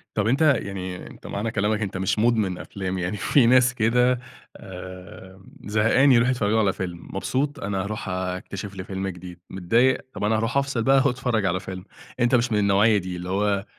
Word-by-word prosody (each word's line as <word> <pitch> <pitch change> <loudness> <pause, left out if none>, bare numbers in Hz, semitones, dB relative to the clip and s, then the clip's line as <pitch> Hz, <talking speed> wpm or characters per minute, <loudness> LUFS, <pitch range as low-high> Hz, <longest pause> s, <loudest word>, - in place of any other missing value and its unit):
طب 105 -1 +1
أنتَ 135 +7 +1
يعني 95 -11 0
أنتَ - - -12
معنى 105 +3 -3
كلامك 105 +1 0
أنتَ 95 -2 -3
مش 95 +3 0
مدمن 110 -5 +1
أفلام 95 -1 -5
يعني 90 +4 -2
في 130 +5 +3
ناس 125 +1 +5
كده 125 +2 +2 0.4
آآ، 95 +1 -11 0.2
زهقان 115 +6 +3
يروحوا 125 +1 +4
يتفرجوا 110 -3 +1
على 100 -3 +2
فيلم، 90 -2 -5 0.2
مبسوط 140 +8 -1
أنا 95 -2 -2
هاروح 105 -1 -5
أكتشف 95 +2 -5
لي 95 - -6
فيلم 95 +1 -4
جديد، 90 -1 -8
متضايق 115 +8 +1
طب - - -6
أنا 110 +1 +2
هاروح 115 +4 -1
أفصل 135 -4 0
بقى 135 +1 +4
وأتفرّج 125 -5 0
على 95 -1 0
فيلم. 95 -1 -8 0.4
أنتَ 120 +1 +3
مش 120 0 +1
من 105 - +2
النوعية 105 +2 +4
دي 95 -1 -4
اللي 90 +1 -6
هو 100 0 0
105 Hz, 185 wpm, -24 LUFS, 95-120 Hz, 0.4 s, ناس